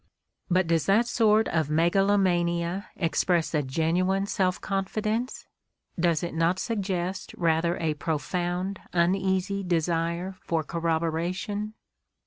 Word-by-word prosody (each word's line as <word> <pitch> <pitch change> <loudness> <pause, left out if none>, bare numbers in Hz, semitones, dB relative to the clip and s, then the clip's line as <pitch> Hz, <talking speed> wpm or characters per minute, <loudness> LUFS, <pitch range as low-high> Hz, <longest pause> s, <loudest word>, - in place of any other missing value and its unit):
But 185 0 +3
does 165 -3 +1
that 215 +5 +4
sort 220 -2 +3
of 160 -3 0
megalomania 175 +1 +2
express 170 -1 +1
a 150 - +2
genuine 170 +8 +1
self 185 -2 0
confi 195 +2 -2
dence? 230 +4 -2 0.5
Does 170 -2 +2
it 170 - -3
not 165 +3 +2
suggest 190 -4 -3
rather 170 0 +1
a 160 -2 0
profound, 175 +5 -2
uneasy 190 +2 +1
desire 170 +1 -1
for 165 -2 -1
corroboration 170 +7 -2
175 Hz, 110 wpm, -27 LUFS, 165-195 Hz, 0.5 s, that